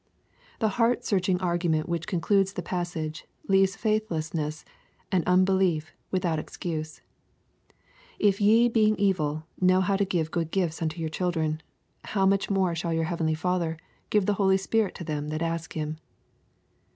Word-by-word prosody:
— - - -30
The 220 - +3
heart 235 +2 +2
searching 185 -2 +1
argu 175 -1 0
ment 155 -1 +1
which 170 -1 -2
concludes 195 +1 +1
the - - -4
passage, 170 -4 -4 0.2
leaves 195 0 +3
faithlessness 160 -8 -2 0.5
and 185 -3 +2
unbelief 185 -3 +2 0.2
without 175 -4 0
excuse: 155 -1 -5 0.6
" - - -36 0.3
If 200 -1 +2
ye 225 +4 +6
being 215 -2 +3
evil, 155 -7 0 0.2
know 185 0 +4
how 195 +1 +1
to 200 - +2
give 165 -4 -1
good 165 -2 -1
gifts 170 -3 -1
unto 160 +1 -2
your 160 -1 -2
children: 160 -2 -1 0.4
how 195 -2 +1
much 195 0 +2
more 190 -3 +2
shall 165 0 -2
your 165 0 +1
heavenly 160 -1 0
Father 170 -1 -1 0.3
give 210 -3 +2
the 205 - +2
Holy 190 -1 +4
Spirit 205 +1 0
to - - -6
them 150 -2 -3
that 155 +2 -2
ask 165 -1 -3
him.'' 155 0 -4
175 Hz, 165 wpm, -27 LUFS, 160-195 Hz, 0.6 s, ye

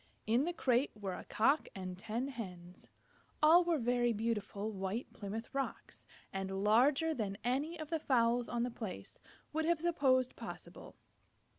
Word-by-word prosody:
In 235 +6 +3
the 350 - 0
crate 260 -4 +2
were 200 -3 -4
a - - -7
Cock 275 +8 +2
and 185 -1 -5
ten 225 +7 -3
Hens. 180 -8 -8 0.5
All 335 +4 +8
were 340 -2 +2
very 240 -1 +2
beautiful 215 -1 -2
White 195 +4 -3
Plymouth 220 +4 -6
Rocks, 275 0 -4 0.3
and 195 0 -2
larger 270 +9 +4
than 205 -7 -3
any 285 +8 -1
of 310 0 -6
the 325 - +1
fowls 240 -3 +2
on 235 -1 0
the 245 - -2
place 190 - -7 0.3
would 315 +1 0
have 340 -1 +2
supposed 265 -7 +2
possible. - - -9
240 Hz, 155 wpm, -35 LUFS, 205-280 Hz, 0.5 s, All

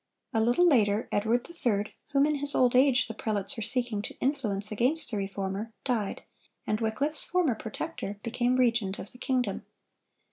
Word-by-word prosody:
A 225 - +2
little 245 +10 +4
later, 215 -7 +3
Edward 225 +4 0
III., 225 -11 -2 0.2
whom 280 -1 +3
in 305 - +1
his 285 0 +3
old 250 -1 +3
age 260 0 +4
the 225 - -6
prelates 210 +2 -3
were 225 - -5
seeking 235 -2 +2
to - - -8
influence 215 -8 0
against 250 +7 +2
the 215 - -2
Reformer, 195 +2 -4
died, 225 -6 -2 0.4
and 215 +1 -1
Wycliffe's 275 +8 0
former 355 -8 +1
protector 210 -2 -6
became 245 +2 0
regent 235 -6 +1
of - - -9
the 250 - -15
kingdom. 250 -8 -1
235 Hz, 170 wpm, -28 LUFS, 210-260 Hz, 0.4 s, little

